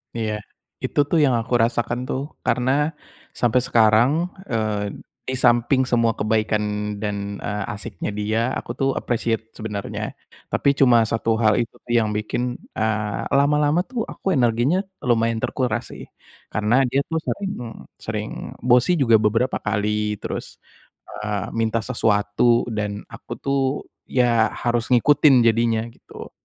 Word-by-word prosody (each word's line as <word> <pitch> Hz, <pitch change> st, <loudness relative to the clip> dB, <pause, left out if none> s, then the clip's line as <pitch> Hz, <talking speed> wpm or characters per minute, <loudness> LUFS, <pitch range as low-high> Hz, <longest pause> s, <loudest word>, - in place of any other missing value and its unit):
Iya. 110 Hz, -2 st, -1 dB, 0.5 s
Itu -, -, -1 dB
tuh 170 Hz, -, +2 dB
yang 130 Hz, -3 st, +2 dB
aku 115 Hz, -, -6 dB
rasakan 120 Hz, +1 st, 0 dB
tuh. 130 Hz, -, -2 dB, 0.2 s
Karena 125 Hz, +1 st, +1 dB, 0.7 s
sampai 120 Hz, +1 st, +3 dB
sekarang, 115 Hz, +3 st, +5 dB, 0.4 s
eee, 105 Hz, -3 st, -1 dB, 0.3 s
di 130 Hz, -, -1 dB
samping 125 Hz, +2 st, +3 dB
semua 115 Hz, -3 st, +1 dB
kebaikan 110 Hz, 0 st, 0 dB, 0.4 s
dan, 100 Hz, -1 st, -4 dB
eee, 105 Hz, 0 st, -2 dB
asyiknya 105 Hz, -, -6 dB
dia, 105 Hz, +2 st, 0 dB
aku -, -, -5 dB
tuh 135 Hz, -, +2 dB
appreciate 115 Hz, -1 st, -2 dB
sebenernya. 105 Hz, -2 st, -5 dB, 0.3 s
Tapi, -, -, +1 dB
cuma 120 Hz, -4 st, +6 dB
satu 115 Hz, 0 st, 0 dB
hal 110 Hz, +1 st, +4 dB
itu 120 Hz, 0 st, -3 dB, 0.2 s
yang 115 Hz, -2 st, +3 dB
bikin, 120 Hz, +3 st, -2 dB, 0.2 s
eee, 110 Hz, -1 st, -1 dB
lama-lama 150 Hz, +4 st, +3 dB
tuh 240 Hz, +1 st, -4 dB
aku 190 Hz, -, -3 dB
energinya 120 Hz, +7 st, +2 dB, 0.3 s
lumayan 115 Hz, -2 st, +1 dB
terkuras 125 Hz, -5 st, -1 dB
sih. -, -, -9 dB, 0.5 s
Karena 105 Hz, +3 st, +2 dB
dia 135 Hz, +3 st, +1 dB
tuh 165 Hz, 0 st, 0 dB
sering 200 Hz, -1 st, -2 dB, 0.5 s
sering -, -, -4 dB, 0.3 s
bossy 125 Hz, +7 st, +4 dB
juga 115 Hz, -4 st, +5 dB
beberapa 115 Hz, +4 st, +1 dB
kali, 105 Hz, 0 st, -1 dB
terus, -, -, -6 dB, 0.5 s
eee, 105 Hz, -2 st, -3 dB
minta 115 Hz, 0 st, +1 dB
sesuatu, 110 Hz, 0 st, +2 dB
dan 105 Hz, -1 st, -3 dB
aku -, -, -12 dB
tuh, 140 Hz, 0 st, -1 dB, 0.5 s
ya, 120 Hz, -3 st, +3 dB, 0.2 s
harus 120 Hz, 0 st, 0 dB
ngikutin 145 Hz, +2 st, +5 dB
jadinya 115 Hz, 0 st, +2 dB
gitu. -, -, -12 dB
115 Hz, 135 wpm, -22 LUFS, 110-125 Hz, 0.7 s, cuma